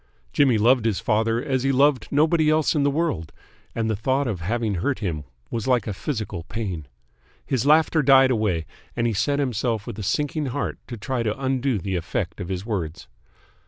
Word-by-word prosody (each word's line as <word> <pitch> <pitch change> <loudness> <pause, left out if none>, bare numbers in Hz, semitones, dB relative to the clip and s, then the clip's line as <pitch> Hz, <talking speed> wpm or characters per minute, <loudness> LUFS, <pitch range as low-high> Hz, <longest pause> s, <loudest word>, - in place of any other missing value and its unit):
Jimmy 135 -6 +4
loved 120 +2 +4
his 110 -4 +1
father 115 +4 +1
as 130 -3 0
he 135 +1 +1
loved 135 -2 +3
nobody 155 +2 +3
else 155 0 +3
in 150 - +1
the 140 - +3
world, 140 - -1 0.4
and 115 -1 0
the 110 - 0
thought 130 +7 0
of 105 -8 -3
having 110 +4 -1
hurt 100 +10 -1
him 80 -8 -3 0.3
was 115 +1 -3
like 125 -5 +2
a 105 - -3
physical 110 - -4
pain. 95 -9 -4 0.6
His 130 0 0
laughter 155 +1 +4
died 135 -1 +6
away 105 -9 0 0.3
and 120 - 0
he 115 - +1
set 115 +8 +1
himself 120 -5 -1
with 115 -3 -7
a - - -3
sinking 145 +8 -1
heart 135 +3 -3
to 120 - -6
try 125 +3 -2
to 110 +1 -2
undo 130 -2 0
the 95 0 -3
effect 85 +2 -3
of 90 - -5
his 95 +1 -3
words. 90 -8 -4
120 Hz, 195 wpm, -24 LUFS, 105-135 Hz, 0.6 s, died